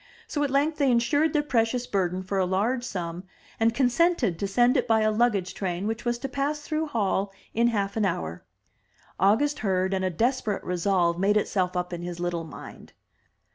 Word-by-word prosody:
So 290 - -3
at 285 - 0
length 290 +4 +1
they 280 -2 +3
insured 285 +6 +2
their 295 -1 +1
precious 245 -2 0
burden 185 -4 -1
for 195 +1 -2
a 185 - +2
large 220 +7 0
sum, 175 -6 -5 0.4
and 225 0 +4
consented 250 - +2
to 200 - -1
send 240 +6 +3
it 255 - +1
by 225 -1 +3
a 215 0 +3
luggage 215 -5 +1
train 185 -1 -3
which 225 +2 -3
was 240 0 0
to 270 - -4
pass 280 +3 -2
through 310 +1 -2
Hall 200 -6 0 0.2
in 235 +1 +3
half 200 -4 -1
an 220 - +1
hour. 85 - -2 0.8
August 225 +10 +3
heard, 190 -2 0
and 190 0 -1
a 185 - +1
desperate 225 - -1
resolve 180 -1 +1
made 205 +2 +3
itself 185 -3 0
up 180 0 -3
in 175 - -4
his 175 0 -6
little 175 -1 -2
mind. - - -11
210 Hz, 195 wpm, -26 LUFS, 185-250 Hz, 0.8 s, and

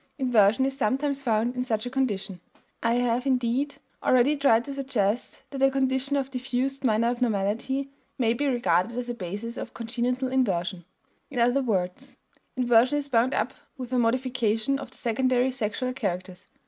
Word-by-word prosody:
Inversion 245 -2 +4
is 270 0 -1
sometimes 275 +3 0
found 235 -1 +1
in 250 - -1
such 220 -3 -1
a - - -3
condition. 205 -9 -2 0.4
I 230 0 +2
have, 245 +1 +1
indeed, 260 +2 +1 0.3
already 255 +4 +4
tried 240 -5 +3
to 280 - -5
suggest 250 -5 -1
that 270 -1 -5
a 270 - +6
condition 265 +1 0
of 270 -1 -2
diffused 260 +1 -2
minor 230 -1 +3
abnormality 240 +3 -1 0.3
may 230 -3 +2
be 285 +5 -1
regarded 235 -3 +1
as 245 0 -3
a - - -1
basis 210 +3 -6
of - - -7
congenital 245 +3 -1
inversion. 190 -8 0 0.4
In 275 - -8
other 245 +3 +3
words, 210 +2 -2 0.4
inversion 245 +3 +4
is 285 -1 -3
bound 245 +1 +2
up 220 +4 0 0.2
with 255 -1 -6
a 250 - +3
modification 240 +1 +1
of - - -7
the - - -11
secondary 255 +2 +1
sexual 255 +1 -2
characters. 185 -6 -4
245 Hz, 165 wpm, -26 LUFS, 225-265 Hz, 0.4 s, a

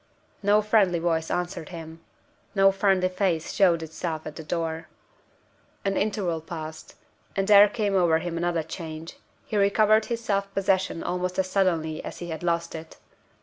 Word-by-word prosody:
No 205 +1 +4
friendly 205 -5 +3
voice 165 -1 0
answered 175 -2 -3
him. 165 -2 -9 0.5
No 195 0 +6
friendly 195 -1 +2
face 185 -3 -1
showed 170 -4 +3
itself 160 0 -5
at 155 - -7
the 160 - -7
door. 165 0 -3 1.0
An 195 0 +1
interval 195 -6 -1
passed; 160 -1 -8 0.4
and 195 0 0
there 205 0 +8
came 205 -3 -1
over 170 -4 +4
him 170 +1 -4
another 170 -1 0
change. 160 0 -8 0.3
He 215 - -2
recovered 215 +2 +4
his 235 -1 -4
self 200 -2 -1
possession 190 -3 +1
almost 180 0 -2
as 185 -1 0
suddenly 165 -5 0
as - - -7
he 175 - -7
had 160 - -5
lost 170 -1 -1
it. 160 0 -9
175 Hz, 160 wpm, -26 LUFS, 165-195 Hz, 1.0 s, there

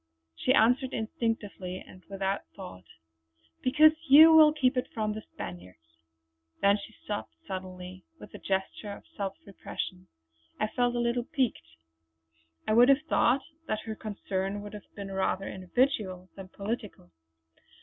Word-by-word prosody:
She 255 - 0
answered 250 +4 +3
instinctively 215 -5 -3
and 185 - -15
without 195 0 -3
thought: 180 - -10 0.8
"Because 305 +4 +6 0.2
you 315 +4 +10
will 310 -1 +8
keep 275 -3 +1
it 250 - -1
from 215 -2 -2
the 215 - -6
Spaniards!" 85 -2 -10 0.6
Then 200 +1 +4
she 205 - -10
stopped 205 - -5
suddenly, 185 -1 -7 0.2
with - - -12
a 210 - -8
gesture 195 +2 -3
of - - -12
self 195 -1 -4
repression. 185 -1 -6 0.5
I 215 - 0
felt 245 +1 0
a - - 0
little 240 0 0
piqued. 220 - -2 0.9
I 215 - +2
would 240 +3 +7
have 275 +2 +5
thought 265 -4 +2 0.2
that 215 -2 -1
her 220 - -5
concern 200 -2 -4
would 205 - -9
have 210 - -11
been 200 -1 -7
rather 190 0 -1
individual 185 -2 -1
than 195 -1 -9
political. 200 - -6
205 Hz, 145 wpm, -29 LUFS, 185-240 Hz, 0.9 s, you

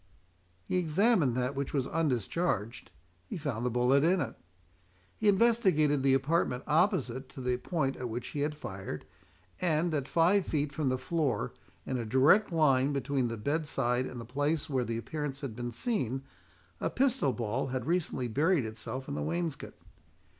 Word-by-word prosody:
He 185 - 0
examined 175 - +3
that 125 +2 0
which 140 -1 -3
was 135 -3 +1
undischarged—he 110 - -2
found 140 -8 -3
the 125 - +1
bullet 125 +4 +3
in 180 +3 +3
it. 145 - -2 0.8
He 215 - -1
investigated 190 - +4
the 135 0 +4
apartment 135 -2 +1
opposite 150 - +1
to - - -11
the 125 -1 0
point 135 -1 -1
at 125 -1 -4
which 120 +2 -4
he 145 - -5
had 150 +1 -1
fired, 95 - -6 0.6
and, 165 -1 +1
at 140 -3 -1
five 175 +5 +3
feet 150 -2 -1
from 140 -2 0
the 130 - +1
floor 145 -7 -1 0.3
in 130 -1 -2
a - - -2
direct 135 - +5
line 145 -4 +3
between 135 -2 0
the 115 0 -4
bed 150 +8 -1
side 125 -2 0
and 125 - -7
the 115 - -7
place 145 +5 -1
where 130 -4 0
the 115 -1 -3
appearance 145 +2 -4
had 130 -6 -5
been 120 0 -4
seen, 135 - -2 0.6
a - - 0
pistol 255 - +2
ball 120 +2 -2
had 130 -2 -3
recently 160 -7 0
buried 145 +4 +2
itself 110 +4 -6
in 140 - -4
the - - -3
wainscot. 165 -1 -3
140 Hz, 170 wpm, -30 LUFS, 125-165 Hz, 0.8 s, direct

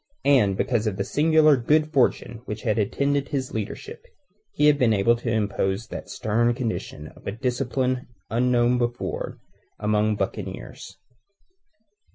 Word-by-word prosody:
And 105 -9 +4
because 120 -4 0
of 100 -3 -2
the 100 - 0
singular 155 +3 +4
good 150 +5 +1
fortune 120 -3 +1
which 105 0 -6
had 110 -1 +1
attended 140 +6 0
his 130 -2 -3
leadership, 110 -2 -6 0.5
he 150 - +1
had 150 -1 +5
been 115 -3 +4
able 105 +4 +3
to 120 0 -4
impose 105 -1 -1
that - - -7
stern 120 +1 +1
condition 110 -10 -4
of - - -16
a - - -1
discipline 125 +2 -1 0.2
unknown 120 +1 +2
before 120 0 -3 0.4
among 105 0 +1
buccaneers. 95 -1 -6
120 Hz, 140 wpm, -24 LUFS, 105-130 Hz, 0.5 s, had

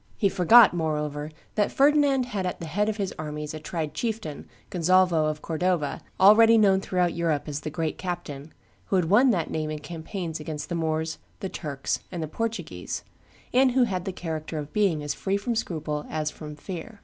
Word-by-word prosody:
He 200 - +3
forgot, 200 +4 +7
moreover, 150 -3 -2 0.2
that 210 -1 +1
Ferdinand 280 -2 +4
had 210 -6 -3
at 180 - -4
the 170 - -5
head 205 +7 0
of 215 - -2
his 195 -3 -2
armies 150 0 -5
a 155 - -5
tried 155 -1 -4
chieftain, 215 -10 -4 0.2
Gonzalvo 180 -2 +3
of 155 0 -3
Cordova, 165 -2 -1 0.2
already 225 +4 +7
known 195 -3 +4
throughout 180 -2 0
Europe 165 -4 0
as 145 -1 -3
the 150 - -5
great 155 0 -3
captain, 160 -5 -5 0.3
who - - -1
had 180 -2 +1
won 250 +6 +6
that 175 -9 0
name 155 -1 -2
in 155 - -3
campaigns 160 +2 -5
against 150 0 -5
the - - -3
Moors, 160 -1 -1 0.2
the 190 - -4
Turks, 140 -6 -3
and 175 -3 -3
the - - -3
Portuguese, 175 - -4 0.5
and 255 0 +4
who 255 0 +4
had 185 -6 -2
the 190 - -2
character 160 -3 -5
of 150 -1 -6
being 190 -8 +2
as 145 -1 -2
free 195 +5 -1
from 220 +4 -2
scruple 155 -8 -3
as 155 -1 -2
from 150 -1 -9
fear. 185 +7 -8
170 Hz, 195 wpm, -26 LUFS, 155-200 Hz, 0.5 s, forgot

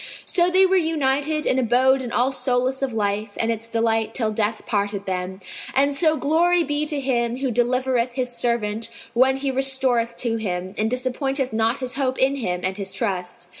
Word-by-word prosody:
So 350 0 +2
they 375 +1 +5
were 380 0 +3
united 305 -2 0
and 260 - +2
abode 260 +2 +3
in 245 -2 -5
all 250 +2 +2
solace 260 0 0
of 270 -2 -1
life 205 -1 -2
and 230 0 +1
its 230 0 -4
delight 225 -1 0
till 220 -4 0
death 215 0 -1
parted 200 -1 -2
them; 185 0 -3 0.4
and 280 +1 +3
so 310 +2 +2
glory 340 +4 +2
be 295 0 -1
to 295 -2 0
Him 240 -3 0
who 265 -1 -1
delivereth 245 +1 +1
His 250 -1 -2
servant 230 -2 -1 0.2
when 260 +2 +4
he 270 0 -1
restoreth 260 -3 +1
to 230 -2 -1
Him, 185 -3 -4
and 215 +2 0
disappointeth 255 +1 -2
not 225 +4 +1
his 255 -1 -2
hope 265 -2 -1
in 270 +1 +2
Him 180 -8 -2
and 190 +1 -1
his 195 -2 -4
trust! 180 -6 -4
250 Hz, 190 wpm, -22 LUFS, 220-270 Hz, 0.4 s, they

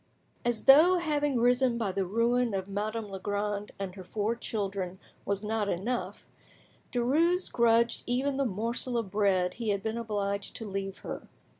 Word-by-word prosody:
As 240 -2 0
though 315 +7 +7
having 295 -6 0
risen 245 0 +3
by 215 -5 -1
the 190 -1 -1
ruin 230 +2 +1
of 190 0 -3
Madame 210 +2 -3
Legrand 205 +1 -3
and 195 -2 -5
her 190 -1 -9
four 215 +4 -1
children 195 -5 -3 0.3
was 200 +1 -1
not 215 -1 0
enough, 220 +8 -3 0.6
Derues 320 +10 +2
grudged 235 0 +3
even 265 +3 0
the 275 - +1
morsel 235 +3 0
of 220 -5 -3
bread 190 -3 +2
he 230 -2 -3
had 200 -1 0
been 220 +1 -2
obliged 200 -3 -2
to 225 - -5
leave 195 -1 -4
her. - - -6
220 Hz, 160 wpm, -29 LUFS, 200-245 Hz, 0.6 s, though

